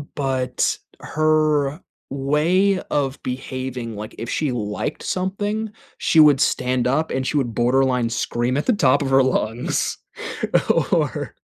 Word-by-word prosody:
but 130 -3 0 0.2
her 155 -1 +1 0.3
way 160 +8 +2
of 140 -2 -1
behaving, 130 -2 -5
like, 105 +1 -7
if 115 - -5
she 150 -4 0
liked 105 -4 -3
something, 205 +4 -2 0.3
she 165 - +2
would 145 -3 +6
stand 125 -3 +1
up 150 +5 0
and 130 0 -1
she 150 - 0
would 120 -4 -1
borderline 125 0 +2
scream 120 +2 -1
at 145 - -1
the 250 - +3
top 205 - +3
of 140 - -1
her 135 0 +5
lungs. 120 -2 -1 0.9
Or, - - 0
135 Hz, 135 wpm, -21 LUFS, 125-155 Hz, 0.9 s, would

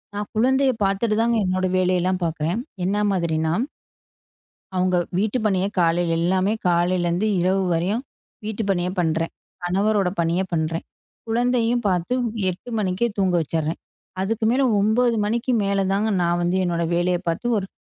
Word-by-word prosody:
நான் 205 0 -4
குழந்தைய 265 +4 +3
பாத்துட்டு 200 +3 +1
தாங்க 235 0 +2
என்னோட 185 0 0
வேலைய 185 -1 +2
எல்லாம் 185 +1 0
பாக்குறேன். 165 +4 -1 0.3
என்ன 195 +3 0
மாதிரினா 160 -3 0 1.2
அவங்க 185 0 +2 0.2
வீட்டு 215 +5 0
பணிய 190 -2 +1
காலையில 170 0 +2
எல்லாமே 185 +4 +1 0.2
காலைல 175 +1 +2
இருந்து 175 +5 0
இரவு 190 +2 +2
வரையும் 185 +8 0 0.4
வீட்டு 220 +1 -3
பணியை 180 -1 0
பண்றேன். 165 0 0 0.3
கணவரோட 195 +2 +1
பணிய 170 +2 +1
பண்றேன். 165 0 -1 0.4
குழந்தையும் 240 +1 +1
பாத்து 180 +4 0 0.4
08:00 185 +7 -9
மணிக்குத் 205 +3 -1
தூங்க 190 -2 +2
வச்சிடுறேன். 160 +1 -2 0.4
அதுக்கு 220 +3 -1
மேல 260 +3 +2 0.2
09:00 230 +3 +2
மணிக்கு 235 +4 0
மேல 200 0 +1
தான், 205 +3 +1 0.2
நான் 175 0 +1
வந்து 175 +2 +1
என்னோட 170 -1 0
வேலைய 175 +1 +1
பாத்து, 165 +8 -2
ஒரு 190 - -3
185 Hz, 145 wpm, -23 LUFS, 175-215 Hz, 1.2 s, குழந்தைய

